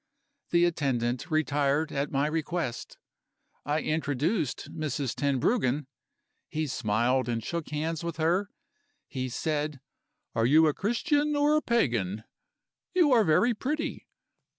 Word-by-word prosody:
The 170 0 +4
attendant 130 -7 -1
retired 150 0 +1
at 140 +1 -1
my 140 +1 +1
request. 160 -4 -3 0.7
I 150 +2 +1
introduced 155 - -1
Mrs. 145 -4 -2
Tenbruggen. 140 - +1 0.6
He 155 0 -1
smiled 125 0 0
and 115 -1 -2
shook 170 -2 -4
hands 160 +2 -2
with 170 -2 -4
her. 175 +5 +1 0.6
He 130 -2 -4
said: 150 +2 -2 0.5
'Are 115 +1 +2
you 155 +4 +6
a 150 - +3
Christian 290 - +1
or 290 +1 +3
a 305 - +3
Pagan? 115 - 0 0.7
You 340 -6 +5
are 235 -3 +6
very 185 +9 +3
pretty. 300 +8 -3
155 Hz, 125 wpm, -28 LUFS, 135-175 Hz, 0.7 s, you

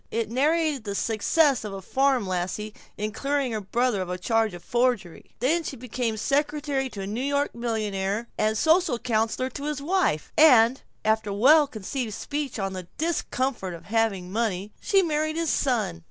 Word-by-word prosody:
It 225 -1 -2
narrated 300 +1 +1
the 200 -2 -4
success 245 +6 +2
of 210 -2 -5
a 195 - -6
farm 265 0 +2
lassie 185 +4 -3 0.2
in 210 +1 -2
clearing 275 +2 -1
her 215 -1 -2
brother 230 +1 0
of 185 - -4
a 180 - -2
charge 225 +1 +1
of 175 - -11
forgery. 240 -6 -1
She 290 +4 0
became 240 -2 -3
secretary 285 +1 0
to 200 - -7
a - - -4
New 215 +5 -3
York 285 +1 0
millionaire 215 -2 -2
and 215 0 +1
social 320 - +3
counselor 230 +2 -1
to 285 - -6
his 300 -1 -2
wife; 310 - 0
and 255 -5 +6 0.2
after 220 -1 +1
a 200 - -3
well 290 +8 +6
conceived 225 -1 -4
speech 290 -3 -4
on 195 -2 -2
the 185 -2 -7
discomfort 260 - -2
of 165 - -12
having 200 -5 0
money, 205 -2 -2
she 390 -1 +3
married 310 -1 0
his 330 -1 0
son. 215 -11 0
235 Hz, 175 wpm, -25 LUFS, 210-285 Hz, 0.2 s, and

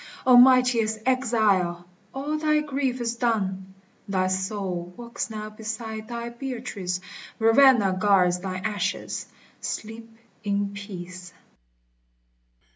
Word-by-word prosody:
O 255 -1 +7
mightiest 245 -3 +5
exile! 215 -9 +2 0.3
all 285 +4 -3
thy 305 -1 +3
grief 275 -3 -2
is 235 -1 -2
done: 190 -5 -1 0.3
Thy 190 -2 +1
soul 190 -2 -3
walks 235 -1 -5
now 215 -1 -6
beside 220 0 -6
thy 235 0 -5
Beatrice; 235 -8 -4 0.4
Ravenna 225 -3 +5
guards 185 -3 +4
thine 185 +1 -5
ashes: 205 -2 -2 0.3
sleep 225 +1 -6 0.3
in 200 0 -1
peace. 185 -3 -8
215 Hz, 105 wpm, -25 LUFS, 190-240 Hz, 0.4 s, O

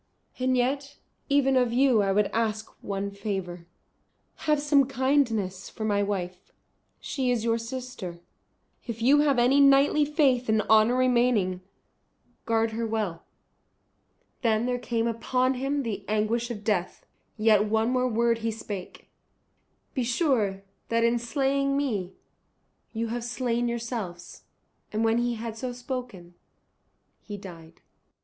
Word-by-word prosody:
And 255 0 +1
yet 275 +3 -1 0.3
even 275 -1 +3
of 250 -2 +3
you 250 -2 +4
I 195 -1 +1
would 205 +1 +3
ask 220 -1 -1
one 200 0 -3
favour. 190 -4 -5 0.8
Have 300 -1 +3
some 285 -2 +3
kindness 245 -8 0
for 220 - -5
my 205 -1 +1
wife. 185 -3 -4 0.5
She 260 -3 -2
is 240 -3 +1
your 230 0 +1
sister; 230 -7 -6 0.7
if 230 -1 -5
you 280 +4 +5
have 290 -3 +3
any 250 +4 +4
knightly 280 +2 +5
faith 275 -5 +2
and 215 -1 +3
honour 220 +3 +4
remaining, 240 -7 +2 0.9
guard 225 -1 +1
her 225 +1 -2
well." 210 -7 -3 1.2
Then 225 -2 +2
there 250 0 -1
came 230 -1 -1
upon 250 +3 0
him 275 +2 -1
the 205 -4 -4
anguish 215 +3 0
of 210 -3 -6
death. 195 -4 -1 0.3
Yet 215 -1 +4
one 220 +2 +1
more 255 0 +1
word 235 0 +1
he 230 0 -1
spake, 205 -4 -7 0.9
"Be 260 - -1
sure 235 - 0 0.3
that 230 0 +2
in 235 +1 +2
slaying 275 +3 0
me 205 -10 -2 0.8
you 230 0 -3
have 235 +1 -3
slain 240 0 -1
yourselves." 230 -7 -5 0.5
And 215 +1 -1
when 225 +1 +3
he 240 0 0
had 225 0 -5
so 255 0 -3
spoken 245 -8 -7 0.9
he 205 -1 -7
died. 170 -4 -12
230 Hz, 140 wpm, -27 LUFS, 210-255 Hz, 1.2 s, you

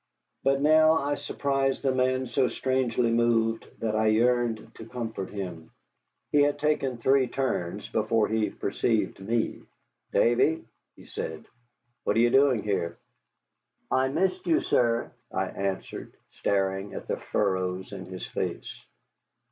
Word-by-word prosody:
But 135 0 +2
now 155 +1 +6
I 145 -2 0
surprised 140 -1 -1
the 135 -1 +2
man 130 0 +1
so 130 +1 +1
strangely 125 -3 0
moved 115 -1 +2
that 110 -1 0
I 110 0 +2
yearned 120 0 +2
to 110 - -11
comfort 115 -6 -5
him. 90 -5 -6 0.6
He 145 - +5
had 145 0 +3
taken 145 -4 0
three 130 +2 +3
turns 120 -9 -2
before 115 -2 +1
he 110 -1 0
perceived - - -1
me. 110 +4 -1 0.5
"Davy," 120 +7 +3 0.3
he - - -15
said, 80 -1 -6 0.6
"what - - +1
are - - +3
you 120 +1 +4
doing 135 -5 +4
here?" 85 -5 -1 0.9
"I 130 0 +3
missed 190 - 0
you, 330 0 +3
sir," 115 -1 +1 0.2
I - - 0
answered, 95 -1 -4 0.2
staring 95 0 -1
at - - -6
the - - -1
furrows 95 -2 -1
in 95 -2 -7
his 95 0 -6
face. - - -4
120 Hz, 140 wpm, -27 LUFS, 105-135 Hz, 0.9 s, now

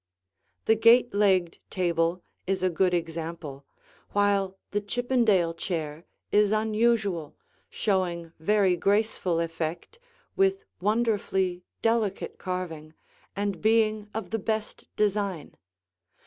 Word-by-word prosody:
The 220 - +5
gate 230 +2 +5
legged 190 -4 +2
table 170 -1 0 0.2
is 190 -1 -1
a 185 - +2
good 180 +2 +2
example, 165 -4 -4 0.5
while 200 -2 +1
the 205 - 0
Chippendale 215 -6 +1
chair 165 -2 -4 0.3
is 210 0 +4
unusual, 215 -6 +1 0.3
showing 175 -5 -1
very 195 +1 +3
graceful 195 -2 +1
effect, 165 - -4 0.4
with 390 +2 +2
wonderfully 200 -4 0 0.2
delicate 225 -4 0
carving, 165 -4 -5 0.4
and 200 -3 -2
being 215 -1 +2
of 215 -4 -5
the 225 - 0
best 220 +1 -3
design. 200 -5 -1
195 Hz, 105 wpm, -27 LUFS, 170-215 Hz, 0.5 s, The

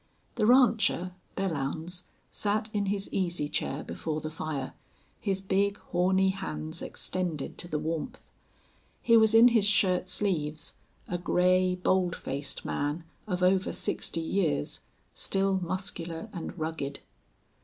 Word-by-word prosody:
The 215 -3 +1
rancher, 230 -7 +4 0.3
Belllounds, 170 0 -2 0.3
sat 210 +1 -1
in 205 -1 0
his 200 0 -1
easy 175 -5 0
chair 145 0 -2
before 155 -1 -3
the 155 0 -5
fire, 155 -4 -4 0.5
his 195 -2 -1
big, 200 +1 +1
horny 190 +2 +2
hands 75 - -4
extended 175 -6 -3
to 175 - -3
the 155 - -1
warmth. 165 - -4 0.7
He 230 - +5
was 220 -1 +6
in 235 +2 +9
his 225 -4 +4
shirt 185 -3 +3
sleeves, 155 -6 -1 0.3
a 175 - -2
gray, 185 +1 +3
bold 180 -1 +1
faced 140 +1 -4
man, 145 +4 -2 0.2
of 180 -2 -1
over 185 +1 +3
sixty 165 - -1
years, 160 - 0 0.3
still 195 -1 +1
muscular 175 0 -3
and 175 0 -6
rugged. 155 -3 -3
180 Hz, 130 wpm, -29 LUFS, 160-195 Hz, 0.7 s, in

